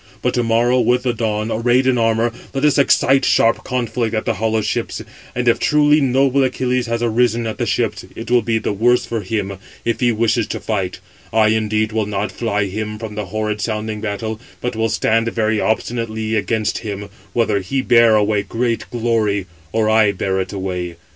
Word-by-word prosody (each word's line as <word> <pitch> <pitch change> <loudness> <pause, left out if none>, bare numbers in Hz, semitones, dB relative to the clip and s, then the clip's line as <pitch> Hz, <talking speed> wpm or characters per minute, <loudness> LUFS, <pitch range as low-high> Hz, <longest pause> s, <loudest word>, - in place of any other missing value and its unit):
But - - +1
to 120 - +1
morrow, 120 +2 +2
with 125 0 +2
the 125 -2 +1
dawn, 110 -1 -2
arrayed 120 +3 +2
in 130 -2 +2
armour, 115 +1 +2 0.2
let 135 +2 +1
us 150 -1 +3
excite 135 -1 +4
sharp 115 -2 +3
conflict 120 -2 -2
at 110 - -2
the - - +1
hollow 110 0 0
ships, - - -3 0.3
and 125 0 -1
if 120 - +4
truly 150 0 +4
noble 135 +1 +3
Achilles 125 -1 0
has 115 0 -1
arisen 120 0 +1
at 110 - -4
the - - -1
ships, - - -1
it - - -7
will 125 -1 +5
be 115 +1 0
the 110 - -2
worse 120 +4 +2
for 115 -2 -3
him, 100 -1 -3 0.3
if 115 -1 0
he 120 -1 +3
wishes 115 0 +1
[to - - -4
fight]: 95 -4 -2 0.3
I 110 -1 +4
indeed 110 0 0
will 110 -1 -1
not 105 0 -2
fly 105 -4 -1
him 105 +2 -4
from 110 -1 -7
the 105 -1 -4
horrid 105 +1 -2
sounding 110 -1 -3
battle, 110 +1 -4 0.2
but 125 -1 -3
will 110 0 0
stand 115 +1 +1
very 110 -1 0
obstinately 110 -1 -2
against 110 0 0
him, 100 -2 -5 0.3
whether 110 -4 +1
he 130 +8 -2
bear 115 -3 +5
away 105 -1 +2
great 115 +4 -2
glory, 110 -5 0 0.3
or 110 +1 +1
I 110 -2 +4
bear 95 0 -1
it 95 - -5
away. 90 -3 -4
110 Hz, 195 wpm, -19 LUFS, 105-120 Hz, 0.3 s, will